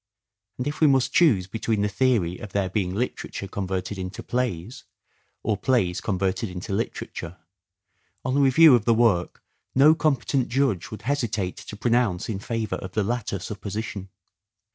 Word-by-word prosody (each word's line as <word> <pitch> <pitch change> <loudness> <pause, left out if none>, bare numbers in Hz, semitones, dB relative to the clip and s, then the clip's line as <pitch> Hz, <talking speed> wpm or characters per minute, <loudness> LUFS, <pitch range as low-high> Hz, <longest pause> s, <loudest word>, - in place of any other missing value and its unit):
And 125 - -3
if 145 +2 -4
we 155 - +7
must 135 -1 +2
choose 120 - +4
between 110 +2 -1
the - - +2
theory 100 -5 +1
of 105 - -9
their 95 -2 0
being 95 -2 -1
literature 110 -3 -3
converted 95 0 -3
into 95 +2 -6
plays, 120 -4 -3 0.6
or 110 - +1
plays 100 -7 +1
converted 95 +2 -1
into 90 +3 -5
literature, 95 -4 -4 0.9
on 130 +1 0
a - - +3
review 140 +3 +7
of 115 -4 +3
the 115 - +4
work 110 -7 +1 0.3
no 145 +4 +7
competent 140 -5 +1
judge 120 -8 0
would 110 - -9
hesitate 115 -9 -1
to - - -9
pronounce 115 -5 +1
in 100 -3 -2
favour 110 -3 -3
of 95 0 -8
the 105 - +1
latter 115 -2 -2
supposition. 100 0 -5
110 Hz, 160 wpm, -25 LUFS, 95-125 Hz, 0.9 s, we